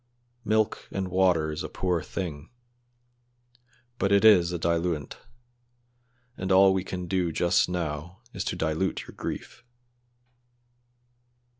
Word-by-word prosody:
Milk 110 0 0
and 95 -1 -3
water 90 -4 +2
is 75 +2 -5
a - - -5
poor 90 -3 -1
thing, 80 -5 -6 1.5
but 100 +1 +1
it 100 +2 +4
is 90 -6 +6
a 90 - -2
diluent, 85 -3 -1 1.2
and 95 0 -3
all 95 0 +6
we 95 -1 -1
can 90 -1 -5
do 90 -1 0
just 85 +3 +2
now 85 +1 -4
is 95 - -3
to - - -2
dilute 80 +2 -1
your - - -13
grief." 120 - -7
90 Hz, 125 wpm, -27 LUFS, 85-95 Hz, 1.5 s, is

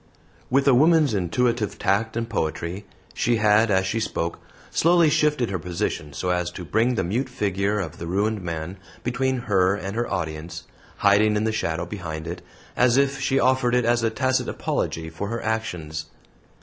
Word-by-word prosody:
With 135 +2 +2
a 135 - +7
woman's 155 0 +4
intuitive 105 +3 0
tact 110 +4 0
and 115 0 -2
poetry, 90 -1 -3 0.3
she 120 - +1
had, 110 0 +4
as 95 -1 +2
she 110 +4 -1
spoke, 85 -6 -2 0.3
slowly 170 -1 +4
shifted 150 -8 +2
her 95 - -2
position 85 -3 -3
so 90 +6 -2
as 90 -1 0
to 90 - -7
bring 115 +9 +1
the - - 0
mute 120 +10 -1
figure 100 -3 -1
of 85 -6 -5
the 85 - -5
ruined 105 +4 0
man 85 +1 -5 0.3
between 130 +1 0
her 95 -1 +3
and 100 0 -5
her 120 +1 -2
audience, 80 -1 -4 0.3
hiding 105 +1 +4
in 105 - +1
the 110 - +1
shadow 85 -6 -2
behind 80 -6 -6
it, 85 +1 -6 0.3
as 125 0 +4
if 140 0 +1
she 135 0 +2
offered 130 -1 +2
it 125 -2 +2
as 120 0 +2
a 115 - +2
tacit 130 +3 0
apology 80 0 -2
for 80 +5 -5
her 115 +2 -4
actions. 90 -9 -3
105 Hz, 180 wpm, -24 LUFS, 90-120 Hz, 0.3 s, a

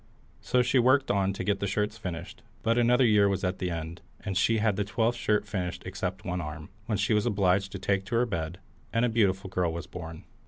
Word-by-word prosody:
So 125 -1 +2
she 125 +1 +3
worked 130 +3 +4
on 100 -1 +2
to - - -4
get 100 -1 0
the 100 - -1
shirts 105 +2 -1
finished, 90 -6 -7 0.2
but 115 0 +2
another 125 +2 +4
year 105 -3 +5
was 95 -1 -1
at 90 0 -2
an 90 - 0
end, 85 +1 -5 0.2
and 95 - -4
she 110 +5 +3
had 110 -2 +2
the 105 - 0
twelfth 115 +3 0
shirt 105 -3 +1
finished 95 -4 -3
except 95 0 -4
one 90 0 -2
arm, 75 -1 -7 0.2
when 110 -3 0
she 100 +3 +1
was 105 +2 +2
obliged 100 -2 +2
to - - -3
take 100 0 0
to 115 - -3
her 120 +2 +3
bed, 85 -6 -3 0.3
and 115 +2 +2
a - - +1
beautiful 100 -4 +1
girl 90 -3 +1
was 85 +1 -5
born. 80 -2 -8
100 Hz, 235 wpm, -28 LUFS, 90-110 Hz, 0.3 s, year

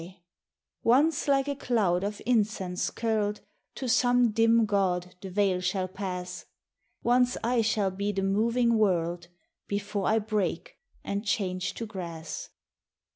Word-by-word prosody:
74 180 +3 -11 0.7
THE - - -1
WELCOME 265 +5 +6
Once 320 -3 -2
like 275 0 +3
a 285 - -1
cloud 205 -9 +1
of 205 +1 -3
incense 210 -6 0
curled 215 -2 -1 0.3
To 260 - -4
some 245 0 +3
dim 225 +1 +4
god, 180 -3 0
the 195 - -6
veil 190 -1 +1
shall 185 0 -1
pass, 180 -1 -6 0.6
Once 245 +1 +3
I 240 +1 +2
shall 210 -3 +1
be 200 +2 -2
the 195 -1 -2
moving 230 +4 +2
world 175 -4 +1 0.4
Before 200 0 -2
I 220 - +3
break 215 - -2 0.3
and 200 +1 -3
change 185 -4 -1
to 230 - -4
grass. 170 -6 -6
205 Hz, 145 wpm, -28 LUFS, 185-230 Hz, 0.7 s, WELCOME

